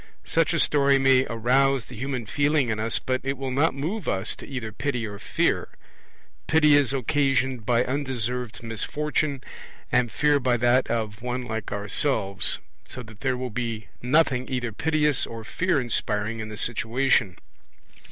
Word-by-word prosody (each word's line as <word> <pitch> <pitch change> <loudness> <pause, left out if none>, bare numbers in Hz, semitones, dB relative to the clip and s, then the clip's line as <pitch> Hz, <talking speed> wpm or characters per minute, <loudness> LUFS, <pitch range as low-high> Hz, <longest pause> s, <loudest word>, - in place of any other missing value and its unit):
Such 165 -2 +2
a 170 - +1
story 140 -2 +4
may 135 -1 +4
arouse 130 +3 +2
the 125 - -11
human 130 0 -3
feeling 145 +2 +1
in 110 - -2
us, 110 +1 +1
but 130 0 -1
it 135 +1 -2
will 135 0 -4
not 140 +3 +2
move 165 +8 -3
us 95 - 0
to - - -10
either 125 -5 -5
pity 125 +1 -2
or 100 -2 -7
fear; - - 0 0.8
pity 150 -2 +5
is 145 -3 +4
occasioned 135 -3 0
by 120 0 +3
undeserved 125 -4 -3
misfortune, 140 +5 -2 0.5
and 120 -2 +2
fear 150 -1 +3
by 125 -2 +1
that 120 +2 +3
of 110 -2 -2
one 125 +1 -3
like 110 -2 -4
ourselves; 100 0 0 0.3
so 125 - -8
that 110 -2 -14
there 130 -2 0
will 125 -1 -4
be 115 -2 -4
nothing 130 -1 +2
either 125 -3 -2
piteous 150 +4 +1
or 115 -1 -7
fear 175 +6 0
inspiring 115 -3 -2
in 110 0 -5
the 105 - -8
situation. 115 -3 +1
125 Hz, 160 wpm, -25 LUFS, 115-140 Hz, 0.8 s, pity